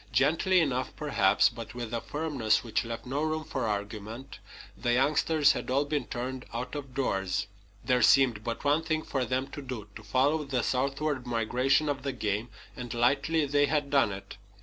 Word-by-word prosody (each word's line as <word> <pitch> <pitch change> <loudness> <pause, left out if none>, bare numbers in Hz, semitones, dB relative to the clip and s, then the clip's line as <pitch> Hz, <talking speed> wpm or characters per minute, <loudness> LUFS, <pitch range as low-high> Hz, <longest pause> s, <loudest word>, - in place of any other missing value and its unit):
Gently 165 +7 +3
enough, 130 -4 -1
perhaps, 105 -10 +3
but 115 0 -7
with 120 -2 -5
a 115 - -1
firmness 145 -8 0
which 115 -3 -1
left 115 0 -6
no 135 +4 -2
room 155 0 -1
for 130 -6 -3
argument, 105 +5 -5 0.4
the 120 - 0
youngsters 150 +3 +3
had - - -4
all 140 +3 +2
been 145 -3 -1
turned 125 +1 -4
out 125 +2 -4
of 140 -4 -6
doors. 95 -6 0 0.4
There 125 -2 +3
seemed 125 -6 +5
but 115 0 -4
one 145 +3 +3
thing 155 -1 -1
for 130 -3 -1
them 130 +3 -1
to 145 - -7
do 125 -6 -6
to 105 - -8
follow 130 +8 +1
the 135 -4 -1
southward 140 0 -1
migration 125 +5 +1
of 140 -2 -1
the 135 0 -3
game; 110 -1 -2 0.3
and 125 -4 -7
lightly 140 +6 +2
they 145 +1 +2
had 145 -2 0
done 135 -7 +4
it. 100 +1 -8
130 Hz, 185 wpm, -29 LUFS, 115-145 Hz, 0.4 s, seemed